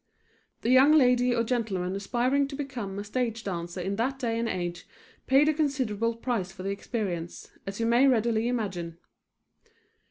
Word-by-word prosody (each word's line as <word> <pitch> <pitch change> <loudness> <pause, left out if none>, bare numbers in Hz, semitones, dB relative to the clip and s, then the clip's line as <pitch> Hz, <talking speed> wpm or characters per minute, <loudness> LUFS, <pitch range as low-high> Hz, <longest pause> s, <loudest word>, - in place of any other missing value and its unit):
The 235 - +2
young 265 +4 +7
lady 250 -4 +4
or 230 - +2
gentleman 210 -6 -1
aspiring 250 +7 +1
to 275 - -7
become 250 -9 -5
a 200 - -3
stage 230 +1 -2
dancer 175 -1 -4
in 195 +3 -2
that 260 +4 0
day 230 -4 -1
and 230 0 -1
age 175 -1 -4 0.4
paid 275 +3 +5
a 310 - +4
considerable 255 -7 0
price 230 -6 -2
for 185 -1 -9
the 195 - -2
experience, 195 -5 -4 0.2
as 195 +2 -5
you 230 - +1
may 240 +4 +5
readily 230 -2 +2
imagine. 190 -9 -3
230 Hz, 165 wpm, -28 LUFS, 195-255 Hz, 0.4 s, young